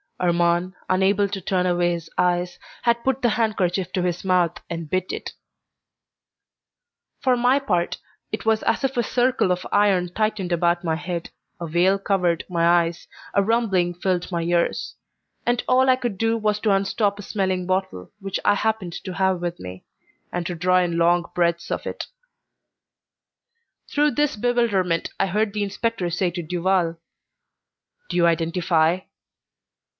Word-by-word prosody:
Armand, 175 +1 +1 0.2
unable 195 +2 +3
to 195 0 -5
turn 180 0 0
away 175 -1 +2
his 165 -1 -6
eyes, 180 0 +1 0.3
had 235 0 +2
put 265 0 0
the 240 - +3
handkerchief 190 -5 0
to 180 - 0
his 175 -1 -2
mouth 180 -3 +2
and 165 -2 -5
bit 185 +1 -1
it. - - -5 1.9
For 255 -2 +3
my 245 +2 +3
part, 180 -11 -1 0.3
it - - -4
was 220 -1 +3
as - - 0
if 270 -1 -1
a 240 - +3
circle 245 -4 +1
of 180 0 -1
iron 195 -4 +3
tightened 215 -4 -1
about 175 +1 +1
my 160 -2 0
head, 170 0 -4 0.3
a 170 - -4
veil 175 +4 +3
covered 180 -4 0
my 170 -1 +2 0.2
eyes, 165 0 -6 0.3
a 200 - +4
rumbling 195 -5 +1
filled 180 0 -1
my 170 -1 -1
ears, 170 0 0 0.5
and 240 0 +1
all 260 +1 +4
I 255 - +6
could 240 -7 -4
do 225 0 +2
was 210 -1 0
to 215 - +2
unstop 200 +1 +1
a 205 - -8
smelling 190 -3 -1
bottle 185 - -2
which 195 -1 -3
I 205 - +5
happened 215 -5 -1
to 185 - -5
have 190 -1 +1
with 175 0 -3
me, 90 0 -9 0.5
and 175 -1 -3
to 175 - -3
draw 180 +2 +3
in 175 -2 0
long 170 0 +2
breaths 170 -1 0
of - - -3
it. - - -5 1.8
Through 295 0 +2
this 295 0 +1
bewilderment 205 -7 +1
I - - +2
heard 210 +2 0
the 210 -1 -1
inspector 200 -2 -2
say 180 +1 +1
to 175 0 -5
Duval, 175 0 0 1.1
"Do - - -2
you 170 - +4
identify?" 165 0 +2
185 Hz, 160 wpm, -23 LUFS, 175-210 Hz, 1.9 s, I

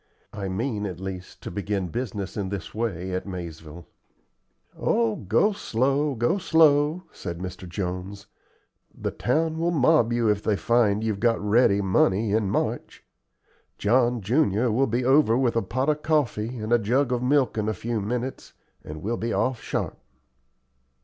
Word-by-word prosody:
I 100 -2 -4
mean 105 +1 -2
at 90 -2 -7
least 95 -1 -7
to - - -6
begin 100 -1 -2
business 105 -2 -4
in 100 -3 -3
this 95 -4 -6
way 95 -5 -3
at 90 +2 -3
Maizeville." 85 -3 -8 0.9
"Oh, 115 -2 +1
go 115 - +2
slow, 140 - 0
go 120 - +1
slow!" 155 0 +3
said 85 -3 -6
Mr. 90 0 -7
Jones. 90 +2 -5 0.7
"The - - -2
town 160 +5 0
will 170 +1 +1
mob 150 -6 +3
you 120 -1 +1
if 105 -1 +2
they 105 -1 +1
find 110 -1 +2
you've 110 -3 -1
got 115 0 +2
ready 105 -1 +3
money 95 +2 +2
in 105 -2 +1
March. - - -2 0.7
John 120 +2 +2
junior 115 0 +2
will 135 +5 +2
be 120 +2 -1
over 130 -3 +4
with 125 -3 +1
a 115 - +2
pot 125 +8 -2
of 150 0 +1
coffee 130 -7 0
and 110 +1 -2
a 120 - +5
jug 125 +5 +1
of 125 -1 0
milk 130 -1 +2
in 110 -1 -1
a - - 0
few 115 +3 -3
minutes, 125 +5 -4 0.3
and 75 +1 -8
we'll 115 +4 -1
be 115 +1 -2
off 130 0 0
sharp." - - -3
110 Hz, 165 wpm, -25 LUFS, 100-130 Hz, 0.9 s, a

